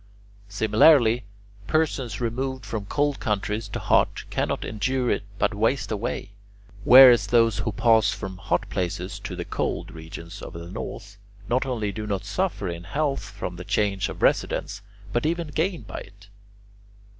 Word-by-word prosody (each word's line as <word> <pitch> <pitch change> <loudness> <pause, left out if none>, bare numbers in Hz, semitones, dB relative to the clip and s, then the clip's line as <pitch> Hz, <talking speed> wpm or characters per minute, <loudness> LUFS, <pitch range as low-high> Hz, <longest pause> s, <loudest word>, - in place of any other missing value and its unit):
Similarly, 110 +3 +4 0.4
persons 135 -8 0
removed 130 +2 -3
from 105 -3 -5
cold 145 +2 0
countries 105 0 -2
to - - -5
hot - - +2
cannot - - -1
endure 125 +4 -1
it - - 0 0.2
but 100 - +1
waste 115 +6 0
away; 105 -1 -3 0.5
whereas 125 -1 +9
those 115 -3 +3
who 110 - -1
pass 110 0 +3
from 95 -3 -6
hot - - -1
places 90 +1 -3
to - - -6
the - - -5
cold - - -3
regions 85 +1 -9
of - - -8
the 85 +1 -8
north, 100 - -7 0.3
not 130 +3 0
only 110 -5 -2
do 105 +2 -6
not 100 -2 -2
suffer 180 - -2
in 85 0 -5
health 140 - -1
from 100 -3 -6
the 90 - -7
change 100 0 0
of - - -7
residence 100 0 +1 0.3
but 120 +5 +1
even 170 -1 -2
gain 160 - -1
by 95 -4 -7
it. 100 +1 -15
110 Hz, 155 wpm, -25 LUFS, 100-130 Hz, 0.5 s, whereas